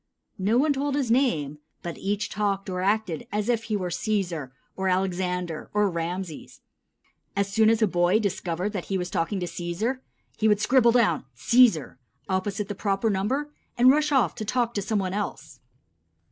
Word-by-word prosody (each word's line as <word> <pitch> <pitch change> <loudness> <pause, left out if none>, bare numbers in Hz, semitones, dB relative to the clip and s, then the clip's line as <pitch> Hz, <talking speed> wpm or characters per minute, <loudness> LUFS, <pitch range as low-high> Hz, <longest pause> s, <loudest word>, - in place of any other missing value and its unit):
No 205 +5 +2
one 290 +3 +3
told 280 0 -1
his 270 -5 0
name, 155 - +1 0.2
but 170 -1 -4
each 205 +2 -1
talked 200 -2 -1
or 180 0 -2
acted 200 -4 0
as 210 +2 -1
if 230 -2 +1
he 215 -2 -1
were 180 -2 -3
Cæsar, 175 - -2 0.3
or 190 0 -1
Alexander, 180 -3 -1
or 210 -2 +3
Rameses. 170 0 -5 0.7
As 200 0 -1
soon 220 0 +5
as 225 0 +3
a - - +5
boy 175 +2 +3
discovered 190 -2 -2
that 190 -4 -4
he 195 - -1
was 180 -1 -4
talking 180 +4 -1
to - - -1
Cæsar, 175 +9 -3 0.4
he 220 - +2
would 210 -1 +4
scribble 235 +1 +4
down 240 -3 +2
"Cæsar" 235 - +4 0.3
opposite 195 +2 -1
the 205 - -3
proper 200 +2 0
number 260 +10 -1 0.3
and 250 +2 +7
rush 300 +1 +2
off 250 - +3
to - - -3
talk 240 +2 0
to 205 - -1
same 210 +2 -1
one 190 -2 -1
else. 205 0 -5
200 Hz, 180 wpm, -26 LUFS, 180-225 Hz, 0.7 s, and